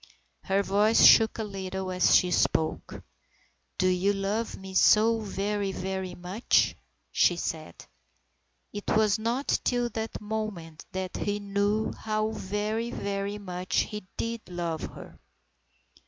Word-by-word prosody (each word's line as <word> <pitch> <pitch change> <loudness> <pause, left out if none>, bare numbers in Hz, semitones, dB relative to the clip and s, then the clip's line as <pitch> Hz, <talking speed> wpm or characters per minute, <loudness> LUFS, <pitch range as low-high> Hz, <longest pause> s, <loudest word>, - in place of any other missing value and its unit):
Her 195 +1 +1
voice 210 +3 +4
shook 225 -1 +7
a 225 - -2
little 190 -2 -5
as 180 0 +4
she 180 - +4
spoke. 160 -2 0 0.4
" 65 +2 -40
Do 185 - +2
you 185 +2 +2
love 200 +3 -2
me 190 0 -9
so 220 +4 +5
very, 205 -1 -2
very 190 -1 -4
much? 180 +6 +1 0.2
" - - -46
she 175 - +3
said. 160 - -5 0.9
It 205 - -6
was 215 -1 +3
not 235 +5 0
till 245 -1 +1
that 220 0 -5
moment 210 -7 -5
that 190 -1 -4
he 205 0 -1
knew 205 +2 0
how 215 0 -2
very, 215 +3 -2
very 200 -1 -3
much 185 -2 -1
he 210 -3 -7
did 230 0 -3
love 170 -3 -3
her. - - -9
200 Hz, 140 wpm, -28 LUFS, 185-215 Hz, 0.9 s, shook